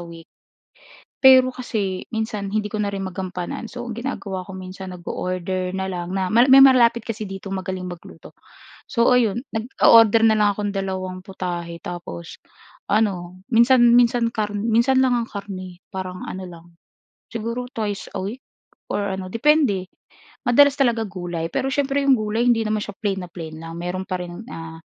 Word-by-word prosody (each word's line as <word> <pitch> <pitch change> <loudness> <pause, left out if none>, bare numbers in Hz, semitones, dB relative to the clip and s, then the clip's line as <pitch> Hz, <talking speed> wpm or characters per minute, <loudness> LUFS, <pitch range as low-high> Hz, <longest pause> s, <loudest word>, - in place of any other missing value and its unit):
week. 165 -1 -12 0.9
Pero 260 -1 +7
kasi 210 -7 -3
minsan 220 -3 -3
hindi 210 0 -2
ko 215 - -2
na 205 - 0
rin 195 -1 -4
magampanan 185 +3 -5
so 240 0 -7
ang 235 - -5
ginagawa 215 -6 -4
ko 190 +1 -9
minsan 185 +1 -8
nag-o-order 185 +1 -3
na 190 - -2
lang 180 0 -4
na 190 +1 -1
ma, 240 +4 +5
may 270 +1 +9
malapit 235 -3 +5
kasi 220 -4 -5
dito 195 0 -7
magaling 185 -1 -4
magluto. 175 -2 -10 0.6
So 235 +1 +3
ayun, 240 0 +2
nag-o-order 225 -1 +5
na 220 - +6
lang 210 -1 +4
akong 205 -1 -2
dalawang 185 -1 -4
putahe 175 -3 -5
tapos, 170 - -7 0.5
ano 185 -3 -1
minsan, 240 +2 +6
minsan 235 -1 +3
kar 210 -1 -2
minsan 235 +5 +2
lang 255 - +2
ang 235 0 -2
karne 185 -3 -8
parang 185 -1 -5
ano 190 0 -6
lang, 170 -1 -13 0.7
siguro 230 +2 -4
twice 215 -6 -4
a - - -2
week 220 +7 -5 0.5
or 205 - -1
ano 190 -1 -3
depende. 230 -8 +2 0.6
Madalas 285 +3 +6
talaga 235 -4 +2
gulay 175 -3 -4
pero 270 - 0
siyempre 280 0 +1
'yong 275 - +6
gulay 215 +3 -1
hindi 230 -2 +4
naman 215 0 0
siya 205 - -7
plain 195 -4 -2
na 175 - -15
plain 160 -2 -8
lang 165 0 -8
meron 180 +2 -3
pa 185 -2 -2
rin, 175 +4 -8
ah, 165 0 -8
200 Hz, 170 wpm, -22 LUFS, 185-235 Hz, 0.9 s, may